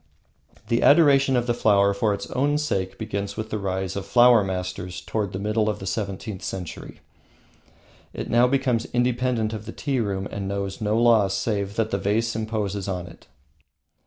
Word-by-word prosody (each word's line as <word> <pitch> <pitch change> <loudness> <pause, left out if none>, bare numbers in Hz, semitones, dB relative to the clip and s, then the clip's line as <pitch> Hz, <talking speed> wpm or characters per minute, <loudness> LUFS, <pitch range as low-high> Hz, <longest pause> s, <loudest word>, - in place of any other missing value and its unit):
The 115 0 +2
adoration 140 -3 +5
of 120 -1 +1
the 120 - +1
flower 100 -3 +3
for 105 +2 +1
its 100 - -3
own 145 +3 +1
sake 95 -11 -2
begins 100 0 -4
with 110 0 -5
the 110 - -2
rise 95 -1 -3
of 100 - -3
"Flower 120 +2 +5
Masters," 90 -1 -4
toward 105 -3 -3
the - - -4
middle 105 +2 0
of 105 - -2
the 95 - -8
seventeenth 100 0 -4
century. 90 -4 -7 1.1
It - - -6
now 120 +1 +4
becomes 130 -3 +1
independent 120 -2 0
of 110 0 -7
the - - -5
tea 135 0 -2
room 100 -3 -2
and 100 -1 -4
knows 100 0 -4
no 105 +1 +1
law 115 -4 +5
save 100 0 -2
that 110 -1 -1
the 100 - 0
vase 110 +4 0
imposes 105 -3 -3
on 90 -2 -3
it. - - -15
105 Hz, 180 wpm, -24 LUFS, 100-120 Hz, 1.1 s, adoration